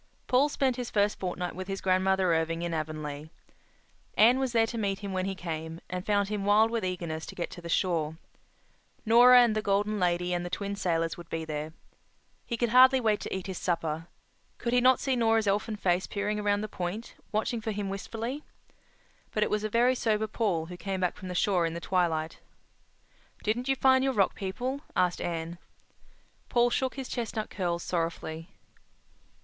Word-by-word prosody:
Paul 265 +4 +3
spent 265 -3 0
his 245 -1 -4
first 205 0 +1
fortnight 180 -1 -3
with 185 +1 -6
his 195 0 -3
grandmother 190 -1 +2
Irving 165 +1 0
in 170 -1 -2
Avonlea. 155 -1 -4 0.9
Anne 240 +4 +6
was 265 -2 0
there 225 -1 +4
to 230 - -6
meet 200 -2 0
him 200 -2 -5
when 185 0 -1
he 195 0 -2
came, 160 -2 -5
and 180 0 -3
found 200 -1 +1
him 210 -2 -2
wild 215 +3 +4
with 230 -3 -1
eagerness 170 -4 -3
to - - -9
get 175 - -4
to 175 - -9
the 170 - -8
shore—Nora 185 +8 +2
and 225 -3 +2
the 215 - +1
Golden 205 +1 0
Lady 180 0 +1
and 175 0 -1
the 175 - -4
Twin 200 +2 -3
Sailors 165 -4 -1
would 170 -1 -11
be 165 0 -3
there. 155 0 -4 0.8
He 235 - -2
could 240 0 +1
hardly 260 +2 +7
wait 220 -4 +1
to - - -4
eat 190 - -5
his 190 -2 -5
supper. 165 -2 -2 0.5
Could 240 0 -2
he 250 - +4
not 255 +1 +5
see 270 -2 0
Nora's 225 -2 +2
elfin 205 +2 0
face 185 -3 0
peering 210 +1 -2
around 205 0 +1
the 215 - -3
point, 200 +3 -5 0.2
watching 220 +2 -1
for 220 - -4
him 205 -1 -2
wistfully? 230 +8 -4 0.9
But 215 - +1
it - - -1
was 210 0 0
a 215 - -1
very 240 +4 +3
sober 220 -3 0
Paul 200 -7 -1
who 175 +1 -9
came 195 0 -3
back 180 - 0
from 185 - -9
the 180 - -5
shore 175 -2 +2
in 165 - -5
the - - -3
twilight. 165 -3 0 1.0
"Didn't 235 +4 -1
you 270 - +2
find 260 0 +4
your 270 0 +1
Rock 200 -5 +2
People?" 250 +8 -4
asked 180 -1 +1
Anne. 165 0 -4 0.9
Paul 240 0 +3
shook 260 +1 0
his 270 -2 -5
chestnut 225 -3 -4
curls 175 -3 -2
sorrowfully. 165 -1 -3
195 Hz, 195 wpm, -29 LUFS, 175-225 Hz, 1.0 s, hardly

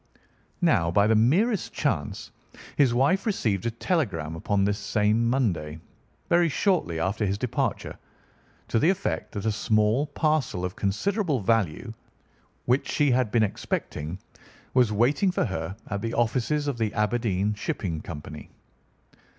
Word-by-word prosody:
Now, 95 - +3
by 100 +4 +3
the 110 - +3
merest 175 - +2
chance, 100 - -2 0.4
his 135 -4 +4
wife 140 - +2
received 110 - 0
a - - +2
telegram 105 - -2
upon 100 +4 0
this 105 +1 0
same 105 +3 +1
Monday, 85 - -1 0.5
very 170 0 +3
shortly 155 - 0
after 95 +6 -1
his 100 -1 0
departure, 125 +1 -2 0.7
to 115 - +2
the 155 - +4
effect 195 +1 -1
that 100 0 -4
a 110 - +2
small 110 +6 +1
parcel 150 - 0
of 90 - -5
considerable 155 - 0
value 110 +1 0 0.7
which 125 +3 +1
she 145 -2 +2
had 125 -2 +2
been 110 +1 +3
expecting 80 -5 -3 0.6
was 125 -4 +4
waiting 130 - +2
for 180 - 0
her 90 0 -4
at 100 -2 -3
the 115 +1 -3
offices 130 +5 0
of 135 -4 -2
the 110 -2 0
Aberdeen 105 -2 0
Shipping 85 -5 -3
Company. 75 -1 -8
110 Hz, 140 wpm, -26 LUFS, 100-140 Hz, 0.7 s, his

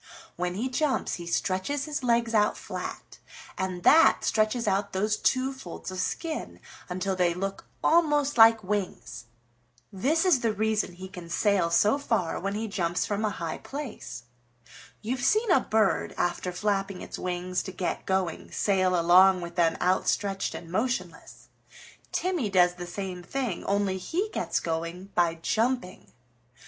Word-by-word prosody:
"When 180 +1 -2
he 230 +6 -1
jumps 265 +1 0
he 170 -1 -8
stretches 190 +11 -1
his 300 -2 -3
legs 235 -1 +2
out 210 -1 +3
flat, - - -7 0.4
and 185 -2 -3
that 325 +2 +6
stretches 220 +2 +1
out 200 +1 0
those 210 +3 +1
two 260 +4 +1
folds 265 -7 -8
of 185 - -5
skin 315 - -3 0.3
until 185 +2 -2
they 175 -2 +1
look 195 +2 -4 0.2
almost 295 -3 +3
like 225 -1 +7
wings. 185 - -4 0.7
This 295 - +1
is 355 -8 +5
the 230 -2 0
reason 215 -2 0
he 185 +2 -9
can 180 -3 -10
sail 195 -2 +2
so 205 +11 +3
far 215 -11 -1
when 195 +2 -3
he 220 +1 -2
jumps 175 -4 -1
from 205 +1 -2
a 215 - +2
high 170 -6 -5
place. 235 - -7 0.8
You've 245 +3 -2
seen 430 - +3
a 350 - +6
bird, 220 -4 +1
after 175 +1 -1
flapping 195 0 -2
its - - -7
wings 180 0 -2
to 190 - -7
get 180 -1 -3
going, 190 -3 -1
sail 185 -3 +2
along 185 +2 +6
with 170 0 -6
them 170 -2 +2
outstretched 195 +2 0
and 165 -1 -9
motionless. 185 -6 -3 0.6
Timmy 355 - -1
does 180 -2 +4
the 175 0 -8
same 185 0 -5
thing, 240 0 -3
only 200 -1 0
he 365 - -2
gets - - -1
going 170 +4 -4
by 170 -2 +2
jumping. 225 +3 -2
195 Hz, 155 wpm, -27 LUFS, 180-235 Hz, 0.8 s, like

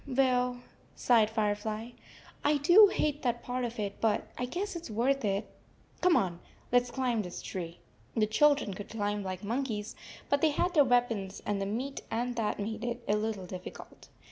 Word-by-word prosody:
"Well," 250 -2 +1 0.3
sighed 225 -3 +4
Firefly, 215 +1 -2 0.5
"I 295 +1 +3
do 350 +9 +8
hate 300 -6 -1
that 240 -2 -1
part 250 0 -2
of 235 0 -4
it, 200 -1 -4
but 220 -2 +1
I 250 - -2
guess 365 +10 -3
it 340 - -4
s - - -8
worth 250 +5 +1
it. 200 0 0 0.5
Come 360 -2 +5
on. 175 -3 -1 0.3
Let 245 0 +6
s 245 - -9
climb 245 -3 0
this 180 -3 -6
tree." 175 -2 -6 0.4
The 215 - +4
children 280 0 +3
could 200 +2 -8
climb 205 -1 -2
like 185 -1 -5
monkeys, 225 -2 -2 0.3
but 285 0 +1
they 320 - +5
had 350 +4 0
their 295 -4 +6
weapons 230 -6 0
and 205 -1 -1
the 195 - -1
meat 255 +7 -3
47 225 - -1
and 245 - -5
that 220 -2 0
made 220 +2 -4
it 240 0 -3
a 205 - +3
little 210 -3 -2
difficult. 180 0 -10
230 Hz, 195 wpm, -30 LUFS, 205-265 Hz, 0.5 s, do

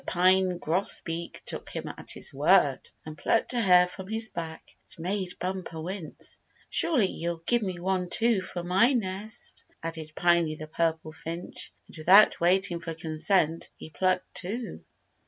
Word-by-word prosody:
Pine 185 0 +3
Grosbeak 170 -1 -1
took - - -6
him - - -5
at - - -8
his - - +1
word, 145 -1 +3 0.2
and 155 -1 -7
plucked 225 +9 +1
a 240 - +1
hair 180 -3 +6
from 185 +1 -9
his 220 +1 0
back. 160 -1 -7 0.2
It 190 - -13
made 185 +1 -3
Bumper 180 -3 -4
wince. 175 -1 -6 0.3
"Surely 270 -11 +2
you'll 170 -2 -4
give 240 -1 +2
me 185 -4 -3
one, 185 0 -1
too, 230 -1 +2
for 180 -1 -5
my 190 +9 +4
nest," 210 -2 -3 0.2
added 160 -1 -5
Piney 170 -3 +3
the 155 - -7
Purple 160 0 -1
Finch, 165 +2 -7
and - - -14
without 185 +6 +6
waiting 180 0 +3
for 165 -1 -6
consent 160 +1 0
he 160 - -10
plucked 185 +1 0
two. 225 +6 -5
180 Hz, 155 wpm, -28 LUFS, 165-190 Hz, 0.3 s, hair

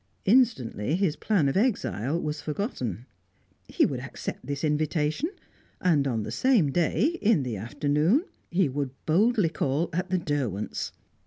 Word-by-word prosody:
Instantly, 190 - +2
his 180 -5 +1
plan 190 -10 +1
of 135 - 0
exile 165 - 0
was 150 -2 -3
forgotten. 130 - -3 0.6
He - - +3
would - - -2
accept - - -6
this 140 -1 -3
invitation, 155 - 0 0.5
and 155 -6 +2
on 115 -5 -1
the - - -5
same 230 - +3
day, 185 - +1
in 205 -9 +3
the 125 -3 -3
afternoon, 150 - +1 0.2
he 180 -1 +2
would 140 0 -2 0.2
boldly 205 +3 +3
call 150 +1 -1
at 180 +2 -2
the 185 - +2
Derwents'. 140 - -2
155 Hz, 145 wpm, -27 LUFS, 140-195 Hz, 0.6 s, He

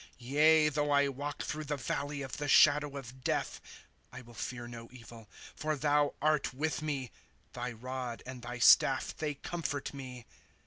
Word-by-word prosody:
* - - -35
Yea, 150 +5 +4
though 150 0 0
I 140 -1 +4
walk 145 +2 -5
through 155 0 -4
the 145 0 -2
valley 140 +2 -3
of 135 - -6
the 145 - -3
shadow 145 -1 +5
of 130 -1 -10
death, - - -1 0.5
I 130 - -9
will 120 0 -15
fear 120 +1 -5
no 115 -1 -9
evil, 115 -3 -13 0.3
for 155 0 -1
thou 145 0 +2
art 150 -4 +1
with 150 -1 -1
me; 140 -6 -3 0.4
Thy 125 - -4
rod 125 0 -5
and 130 -1 -8
thy 120 +1 -6
staff 130 +2 +5
they 150 -2 -3
comfort 145 -2 -4
me. 130 -3 -8
140 Hz, 175 wpm, -32 LUFS, 125-150 Hz, 0.5 s, shadow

